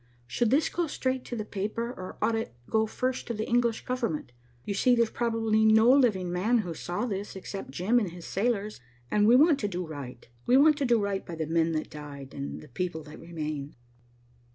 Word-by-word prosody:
Should 230 - 0
this 285 +6 +3
go 345 -1 -1
straight 260 -3 -2
to 245 - -5
the 215 -2 -4
paper, 215 +4 -3
or 185 -7 -8
ought 230 - +2
it 225 - -4
to - - -21
go 220 0 +3
first 255 +3 -2
to 235 - -2
the 215 +1 -3
English 235 -1 +1
government? 230 - -2 0.3
You 200 - -2
see 245 +5 +4
there's 235 -2 +2
probably 225 -2 +1
no 220 +2 +6
living 215 -10 +3
man 205 +7 +2
who 170 - -4
saw 175 +8 -3
this 205 -3 -4
except 195 -2 -6
Jim 185 - +2
and 205 -6 -2
his 170 0 -10
sailors, 210 - -1 0.3
and 210 0 +4
we 235 - +7
want 295 +1 +5
to 205 - -1
do 180 -2 -3
right. 140 -6 -8 0.2
We 250 - +6
want 300 +2 +5
to 280 - +1
do 240 -2 +4
right 200 -1 -1
by 170 - -7
the 160 -1 -2
men 165 +1 +1
that 155 - -3
died, 145 -2 -9
and 140 0 -5
the 150 - -13
people 160 +3 -4
that 150 +1 -11
remain." 155 -4 -5
210 Hz, 220 wpm, -28 LUFS, 165-240 Hz, 0.3 s, we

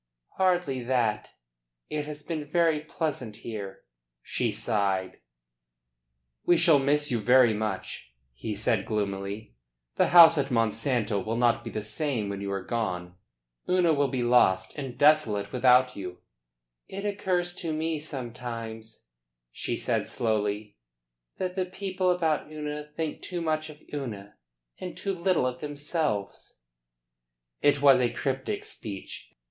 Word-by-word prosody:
"Hardly 175 -8 +1
that. 110 -4 0 0.6
It 150 -1 -3
has 150 -1 -7
been 160 -3 -3
very 160 +1 +2
pleasant 150 -7 -4
here." 100 -4 -6 0.4
She - - -1
sighed. 100 -4 -1 1.2
"We 175 - +4
shall 160 -4 +5
miss 145 +1 +1
you 120 - +1
very 125 +1 +5
much," 105 - -4 0.2
he 105 - -5
said 105 0 +1
gloomily. 100 - -3 0.4
"The - - +4
house 165 -2 +9
at 135 -1 0
Monsanto 115 -2 0
will 110 +1 -2
not 120 -1 +2
be - - -5
the 110 - -4
same 115 -2 -1
when 100 0 -4
you 100 0 -3
are 100 -1 -3
gone. 90 -6 -3 0.6
Una 180 -3 +4
will 140 -1 +2
be 130 -2 -2
lost 95 -6 +3
and 135 -4 -6
desolate 145 -10 +3
without 125 0 +4
you." 90 -2 -6 0.7
"It 195 +2 -6
occurs 185 -3 0
to 165 - -3
me 160 0 -1
sometimes," 115 -5 -6 0.5
she - - -3
said - - -1
slowly, 105 -2 -1 0.6
"that 185 -1 -2
the 185 -1 0
people 185 0 -1
about 160 -4 0
Una 150 -1 -5
think 160 -2 -3
too 180 - -4
much 155 -1 -1
of 150 -1 -12
Una 105 -8 -5 0.4
and 180 - -6
too 195 - -2
little 180 -5 +1
of 125 0 -3
themselves." 145 - -3 1.0
It 145 -1 +3
was 135 -3 +7
a 120 - +3
cryptic 135 - -2
speech. 100 -3 -7
130 Hz, 140 wpm, -27 LUFS, 110-155 Hz, 1.2 s, house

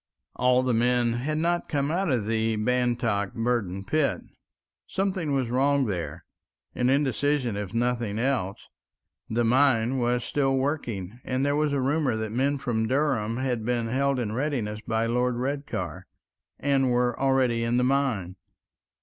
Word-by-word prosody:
All 125 0 +3
the 130 -1 +1
men 120 0 +2
had 140 +6 -2
not 175 +2 0
come 140 0 0
out 180 0 0
of 120 -5 0
the 110 0 0
Bantock 115 -3 0
Burden 115 -5 -1
pit. 155 +2 +1 0.7
Something 185 -7 -1
was 130 -3 -1
wrong 140 +2 +2
there, 90 -6 -4 0.5
an 125 0 +1
indecision 140 -3 +1
if 100 -2 -4
nothing 115 -2 -1
else; 120 -6 -1 0.6
the 120 +2 +1
mine 130 0 +3
was 120 0 +1
still 135 -2 +1
working, 120 - -3
and 130 +2 -1
there 145 0 +1
was 150 0 +1
a 140 - 0
rumor 135 -1 +1
that 110 -1 -3
men 135 +5 +1
from 110 -4 -1
Durham 130 -5 0
had 125 -3 -1
been 120 0 -1
held 140 +2 +1
in 115 -4 -2
readiness 120 -5 -2
by 110 0 +1
Lord 125 +1 +1
Redcar, 120 - -4 0.5
and 135 -2 +2
were 125 0 +2
already 130 -4 +2
in 115 +1 +1
the 125 - +2
mine. 125 -9 0
125 Hz, 155 wpm, -26 LUFS, 115-140 Hz, 0.7 s, All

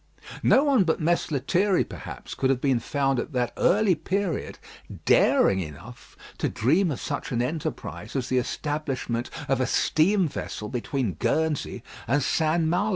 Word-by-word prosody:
No 270 - +5
one 275 -8 +4
but 165 -2 0
Mess 170 +2 +1
Lethierry, 175 +7 +2
perhaps, - - -8
could 130 - 0
have 135 -2 +2
been 130 -3 +2
found 135 +1 0
at 145 - -5
that 120 -2 0
early 205 0 +3
period 180 +1 -2 0.5
daring 95 - +4
enough 85 - -9 0.2
to - - 0
dream 165 - +2
of 140 - -3
such - - -4
an 120 - 0
enterprise 150 +4 -4
as 130 -3 -1
the 130 -1 +2
establishment 135 -3 -3 0.2
of 135 -1 +1
a 130 - +1
steam 185 +3 +2
vessel 105 -7 -5
between 125 -3 -2
Guernsey 160 -2 -1 0.2
and 135 +4 +2
St. 160 +4 +1
Malo. 180 +6 +1
145 Hz, 160 wpm, -26 LUFS, 125-170 Hz, 0.5 s, No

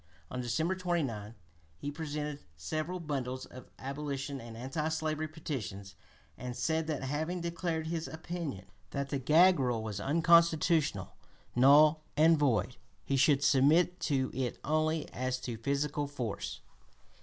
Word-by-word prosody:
On 125 - -3
December 160 +9 0
29 140 - -2 0.4
he 145 - -4
"presented 150 -1 -4 0.2
several 155 - -3
bundles 130 -5 -3
of 130 0 -12
abolition 140 0 -4
and 115 -1 -9
anti 135 +6 -2
slavery 155 -1 -1
petitions," 105 - -6 0.5
and 125 0 -5
said 160 +6 0
that, 150 -4 -2
having 155 +6 -2
declared 170 -1 -2
his 165 0 -3
opinion 160 - -5 0.2
that 140 +3 -3
the 140 - -1
gag 165 +7 +5
rule 120 -4 0
was 105 -3 -4
unconstitutional, 165 - +3 0.4
null, 150 +5 +6 0.2
and 160 +1 +6
void, 130 -7 +1 0.3
he 140 - 0
should 135 +1 +4
"submit 155 +6 +4
to 135 -3 0
it 130 -2 -2
only 155 +1 +1
as 130 0 -1
to 120 -2 -4
physical 140 +4 -1
force." 125 -7 -4
145 Hz, 135 wpm, -32 LUFS, 130-160 Hz, 0.5 s, null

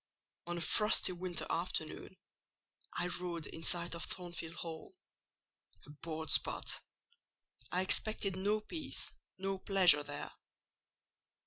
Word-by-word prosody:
"On 175 0 -3
a - - -3
frosty 210 +1 +4
winter 180 0 -2
afternoon, 170 +1 -3 0.8
I - - -1
rode 175 -3 -3
in 165 - -9
sight 170 0 +1
of 170 - -4
Thornfield 175 -2 -5
Hall. 165 - -7 0.9
Abhorred 160 +2 -5
spot! - - +4 0.9
I 180 +1 +1
expected 195 0 +2
no 205 +3 +1
peace—no 195 - -4
pleasure 185 -7 +5
there. 145 0 -7
175 Hz, 105 wpm, -35 LUFS, 165-190 Hz, 0.9 s, pleasure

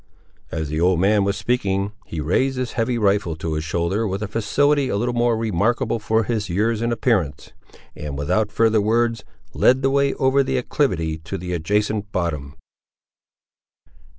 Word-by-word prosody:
As 80 -2 -3
the 75 +2 -2
old 90 0 +3
man 100 +2 +3
was 100 0 0
speaking, 100 -5 0 0.2
he 80 - -5
raised 130 - +1
his 125 -2 -2
heavy 120 +1 -1
rifle 100 -6 +1
to 80 0 -4
his 75 0 -2
shoulder, 85 +7 -1
with 100 +2 -3
a - - -2
facility 140 +6 +1
a - - -1
little 120 +3 -1 0.2
remarkable 115 +2 0
for 110 +1 +1
his 110 -2 -2
years 110 +5 0
and 115 0 0
appearance, 110 - 0 0.4
and 75 -2 -6
without 90 +9 0
further 110 -1 +3
words 115 +2 +1 0.3
led 130 +2 +3
the 135 - +3
way 140 0 +2
over 135 0 +3
the 135 -1 -1
acclivity 85 - -1
to 80 +5 -6
the 90 0 -5
adjacent 105 +4 -1
bottom. 75 -5 -3
105 Hz, 165 wpm, -22 LUFS, 85-120 Hz, 0.4 s, old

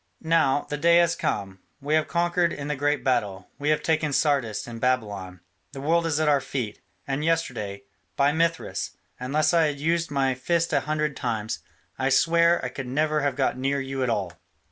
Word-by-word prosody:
Now, 160 -4 +2
the 150 - -3
day 170 +2 +5
has 170 -1 +3
come; 95 -2 -3 0.2
we 145 +2 -2
have 155 0 +2
conquered 175 0 +1
in 145 0 -5
the 150 - 0
great 145 +1 0
battle; 100 -7 -1
we 145 +1 -1
have 155 - +2
taken 155 -2 +1
Sardis 135 -8 +1
and 115 -1 -8
Babylon; 105 -8 -1 0.3
the 135 - -7
world 165 +4 +1
is 155 -2 0
at 155 - +1
our 145 -2 +4
feet, 120 -6 -4 0.2
and 140 +2 -2
yesterday, 120 -12 -1 0.3
by 140 +1 +3
Mithras! 165 +1 -1 0.2
unless 145 +7 +1
I 165 -2 +4
had 145 -2 -4
used 165 +2 0
my 135 -2 +1
fists 165 +6 0
a 145 - +4
hundred 150 0 -1
times, 110 -4 -3 0.4
I 135 0 +1
swear 170 +4 +3
I - - -2
could 130 +1 -6
never 150 +3 +1
have 140 -2 0
got 130 -1 0
near 135 +2 0
you 135 0 -4
at 130 - +1
all. 95 -6 -1
145 Hz, 195 wpm, -25 LUFS, 125-160 Hz, 0.4 s, day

